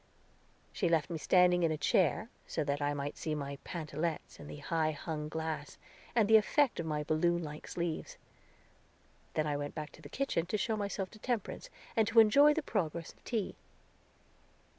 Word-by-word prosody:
She 180 - +1
left 165 0 +2
me 165 - -3
standing 180 +1 +4
in 165 -2 +3
a 155 - -1
chair, 190 +8 +2 0.2
so 155 - -1
that 145 0 -1
I 145 0 0
might 145 +1 -4
see 155 -1 -2
my 140 -1 -5
pantalettes 160 -1 -4
in 145 - -9
the - - -8
high 155 +2 0
hung 150 0 -4
glass, 160 -2 -4 0.4
and 225 -4 +4
the 220 0 +8
effect 260 +5 +2
of 165 - -2
my 150 -1 -1
balloon 170 +3 +1
like 150 0 -7
sleeves. 170 -2 -3 1.2
Then 155 - +2
I 150 -1 0
went 145 0 -5
back 150 -1 -5
to - - -16
the 145 - -10
kitchen 215 -11 -1
to 215 - 0
show 220 +1 0
myself 200 -2 -3
to 215 - -14
Temperance, 245 - -3 0.3
and 220 -2 +3
to 225 +1 +5
enjoy 285 +7 +7
the 320 - -1
progress 170 - -2
of - - -29
tea. 225 -6 -2
165 Hz, 185 wpm, -33 LUFS, 150-210 Hz, 1.2 s, the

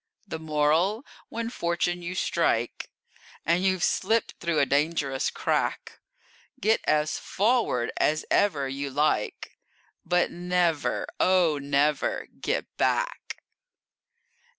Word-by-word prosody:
The 160 - -5
Moral: 160 - +1 0.2
When 230 0 -4
fortune 175 -2 -1
you 175 +1 -5
strike, 120 -10 0 0.6
And 170 +2 +2
you've 185 -1 +1
slipped 220 +3 +1
through 170 -2 -1
a 145 - +4
dangerous 140 -1 0
crack, - - -2 0.6
Get 220 +3 +2
as 155 0 +1
forward 210 - +1
as 155 +1 +1
ever 145 -9 +2
you 140 +1 -4
like, 145 -5 -1 0.4
But 175 0 +1
never, 175 -3 0
oh, 180 -5 +3
never 140 +1 +1
get - - -1
back! - - -1
170 Hz, 105 wpm, -26 LUFS, 145-185 Hz, 0.6 s, a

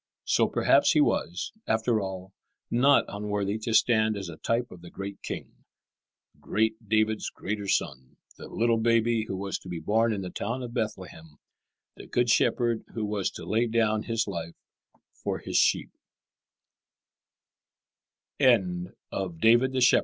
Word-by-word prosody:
So - - +3
perhaps - - +3
he - - +3
was, 85 +2 -1
after 110 0 +1
all, 95 0 -6 0.4
not 135 +4 +4
unworthy 105 0 -2
to 110 +1 -3
stand 110 -3 +3
as 95 -3 -5
a 80 - -9
type 115 +6 -1
of 90 - -12
the 85 - -11
great 100 0 -7
King, - - -7 0.8
"great 110 0 -1
David's 110 0 +1
greater 105 0 -5
Son," 65 -8 -2 0.2
the - - -10
little 115 0 +1
Baby 115 0 +2
who 95 - -4
was 100 0 -3
to 95 - -12
be 90 - -4
born 110 +8 +1
in 100 -2 -2
the 90 - -6
town 120 +5 -3
of 120 -1 -7
Bethlehem, 85 -8 -5 0.6
the - - -11
Good 120 -1 +1
Shepherd 120 -1 +2
who 110 -2 -2
was 105 -2 -1
to - - -9
lay 115 +2 +1
down 110 -2 +1
His 115 0 -1
life 85 -4 -5 0.6
for - - -4
His - - -2
sheep. - - +2
110 Hz, 140 wpm, -27 LUFS, 95-115 Hz, 0.8 s, not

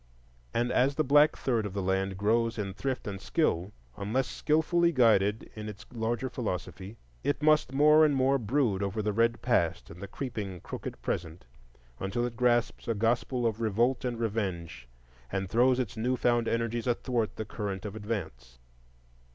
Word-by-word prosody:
And 120 +1 0
as 135 +3 +2
the 155 - +2
black 145 +2 +5
third 120 -4 0
of 100 -2 -5
the 100 - -2
land 95 0 0
grows 115 +3 +1
in 100 -3 -3
thrift 130 +6 -3
and 100 -2 -5
skill, 100 - 0 0.2
unless 115 +6 -1
skilfully 170 +3 +2
guided 110 - +3
in 105 0 -6
its 105 0 -10
larger 115 +2 -1
philosophy, 100 -3 -5 0.3
it 145 +1 -1
must 155 -3 +4
more 150 +3 +6
and 150 -2 +4
more 135 +1 +3
brood 115 -3 +1
over 100 +2 -2
the 105 0 0
red 115 +2 +1
past 85 -10 0
and 85 - -11
the 100 - -5
creeping, 105 -6 -5
crooked - - -7
present, 80 -4 -4 0.5
until 110 +5 -1
it 120 -1 -5
grasps 120 -1 +1
a 115 - 0
gospel 120 +3 0
of 115 0 -1
revolt 115 +4 +1
and 120 -2 -2
revenge 95 - -3 0.4
and 95 0 -2
throws 125 +2 +4
its 120 -6 -3
new 125 +3 0
found 120 -1 +2
energies 115 +1 -1
athwart 120 -2 -1
the 110 - -4
current 100 -2 -5
of 105 0 -5
advance. 80 - -5
115 Hz, 170 wpm, -29 LUFS, 100-125 Hz, 0.5 s, more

